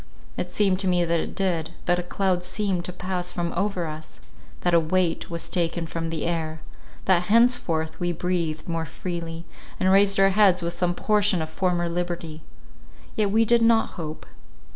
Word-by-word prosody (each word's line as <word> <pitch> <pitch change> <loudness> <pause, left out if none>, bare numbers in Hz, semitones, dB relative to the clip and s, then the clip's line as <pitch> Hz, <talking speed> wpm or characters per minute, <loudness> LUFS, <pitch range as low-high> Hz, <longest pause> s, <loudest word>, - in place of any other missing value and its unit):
It 180 - -3
seems 190 0 +1
to 195 - -1
me 175 -1 +2
that 170 0 +1
it - - -5
did; 175 -4 0
that 175 0 +2
a - - 0
cloud 180 0 -1
seemed 185 -1 -2
to - - -4
pass 180 0 -4
from 175 -1 -3
over 190 -1 -1
us, 155 0 -8 0.4
that 175 - +1
a 170 - +7
weight 165 +1 0
was 170 -1 -3
taken 170 -1 -1
from 165 0 -4
the 160 -2 -3
air; 160 -2 -2 0.5
that 180 -2 +3
henceforth 180 -9 +2
we 175 0 0
breathed 170 -2 -2
more 165 -1 -2
freely, 170 0 -5 0.3
and 185 - +3
raised 195 0 +4
our 195 0 +6
heads 190 -3 +4
with 170 0 -2
some 175 0 -1
portion 205 -3 +2
of 160 0 -4
former 175 -1 0
liberty. 170 -2 -4 0.7
Yet 210 -2 +1
we 225 +3 +3
did 235 +1 +4
not 230 -1 +4
hope. 155 -3 -7
175 Hz, 185 wpm, -25 LUFS, 165-190 Hz, 0.7 s, a